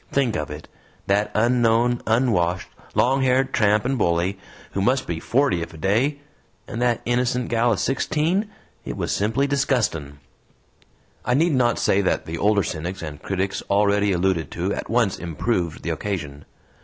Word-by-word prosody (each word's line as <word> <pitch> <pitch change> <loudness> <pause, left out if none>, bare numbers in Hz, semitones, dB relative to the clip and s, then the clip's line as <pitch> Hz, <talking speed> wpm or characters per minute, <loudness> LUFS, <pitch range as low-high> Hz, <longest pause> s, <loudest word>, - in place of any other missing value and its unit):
Think 130 -5 +1
of - - -3
it! 75 +1 -8 0.4
that 100 +2 +1
unknown, 120 +1 +3
unwashed, 105 -7 +1 0.3
longhaired 130 0 +2
tramp 105 +1 +3
and 135 -1 0
bully, 90 +1 +1 0.3
who 95 - -2
must 130 +5 +2
be 85 -2 -3
forty 120 - +1
if 85 0 -6
a - - -10
day, 120 - +1 0.5
and 115 - -5
that 120 -2 +1
innocent 125 0 0
gal 120 +1 +2
of 100 - -2
sixteen. 160 +9 0 0.3
It - - -6
was - - -2
simply 115 +7 +1
disgustin'!" 120 - 0 1.1
I 125 - +1
need 165 +3 +3
not 120 -3 +2
say 100 - +2
that 95 - 0
the 80 +1 -5
older 105 -1 +3
cynics 85 +3 -4
and 75 -2 -7
critics 95 0 -2
already 100 0 +3
alluded 90 -2 0
to 90 +4 -1
at - - -5
once 115 -3 +1
improved 85 0 -2
the - - -1
occasion. 75 -8 -4
105 Hz, 160 wpm, -23 LUFS, 90-125 Hz, 1.1 s, unknown